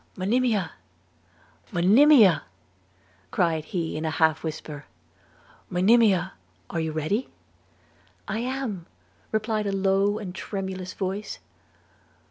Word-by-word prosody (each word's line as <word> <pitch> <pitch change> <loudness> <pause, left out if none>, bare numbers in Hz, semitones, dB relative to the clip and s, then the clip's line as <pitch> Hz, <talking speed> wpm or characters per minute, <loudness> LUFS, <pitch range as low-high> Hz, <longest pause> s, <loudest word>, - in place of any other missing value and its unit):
'Monimia! 205 -3 +1 1.0
Monimia!' 210 - +6 0.8
cried 160 - 0
he 170 -2 -3
in 155 - -3
a 160 - 0
half 160 0 +2
whisper, 150 -2 -6 0.8
'Monimia, 190 0 +3 0.4
are 170 - -2
you 160 -1 -2
ready?' 160 - -1 1.0
'I 215 +3 -2
am,' 245 -8 -3 0.5
replied 215 -1 -1
a - - 0
low 195 +1 +2
and 200 -5 -6
tremulous 190 -2 -5
voice. 195 +2 -4
190 Hz, 100 wpm, -25 LUFS, 170-215 Hz, 1.0 s, Monimia